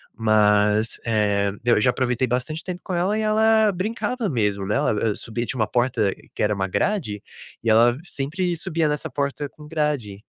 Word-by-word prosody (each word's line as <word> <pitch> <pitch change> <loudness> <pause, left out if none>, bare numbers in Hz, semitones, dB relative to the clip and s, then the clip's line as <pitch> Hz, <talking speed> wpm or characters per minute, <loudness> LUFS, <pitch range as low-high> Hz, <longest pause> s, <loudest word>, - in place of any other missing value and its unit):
mas, 105 0 +3
eh, 105 -3 +1
eu 120 -3 +4
já 125 - +4
aproveitei 125 0 0
bastante 130 +7 -2
tempo 180 -1 -6
com 185 - -5
ela, 185 +5 +1
e - - 0
ela 220 0 +4
brincava 220 +4 -2
mesmo, 105 -6 0
né, 105 - 0
ela, 140 +2 +2
hã, 105 0 0
subia 120 +1 -4
tinha 125 - -5
uma 110 - +3
porta, 120 -5 +1 0.2
que - - -1
era 105 0 +2
uma 95 -1 -1
grade, 110 - -1 0.4
e 115 - +1
ela 120 +2 +5
sempre 175 +3 -2
subia 160 0 -1
nessa 150 0 -2
porta 140 0 -2
com 150 -1 -14
grade, 145 -11 -2
125 Hz, 185 wpm, -23 LUFS, 105-170 Hz, 0.4 s, ela